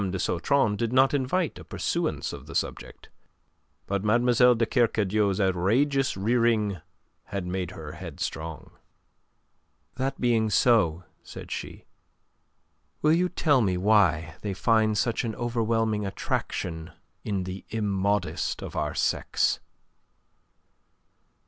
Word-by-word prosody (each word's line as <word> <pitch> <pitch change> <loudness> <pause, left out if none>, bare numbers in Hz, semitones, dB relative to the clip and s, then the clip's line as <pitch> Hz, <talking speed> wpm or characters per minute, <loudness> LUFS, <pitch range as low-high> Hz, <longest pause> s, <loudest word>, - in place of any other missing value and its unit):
de 95 - -3
Sautron 105 +5 +1
did 115 +2 -2
not 130 +2 +4
invite 145 +5 0
a - - -10
pursuance - - -2
of - - -9
the - - -9
subject. - - -4 0.8
But 100 0 -2
Mlle. 120 +3 +4
de 115 0 +1
Kercadiou's 105 -5 +1
outrageous 110 +9 +1
rearing 110 -3 +1 0.4
had 100 -2 -4
made 90 -1 -3
her 80 -5 -8
headstrong. 80 +1 -6 1.3
"That 135 +1 -2
being 115 -3 +2
so," 95 -6 +3 0.2
said - - -10
she, - - -6 1.2
"will 155 +1 +5
you 180 +2 +2
tell 145 -7 +2
me 95 -4 +1
why 90 -5 +2
they 100 -2 -3
find 110 0 +2
such 115 +1 0
an 110 -3 -3
overwhelming 115 -2 0
attraction 80 -3 -3 0.3
in 100 -3 -2
the 95 +1 -6
immodest 100 -2 -1
of - - -7
our - - -2
sex?" - - +1
110 Hz, 115 wpm, -26 LUFS, 95-120 Hz, 1.3 s, will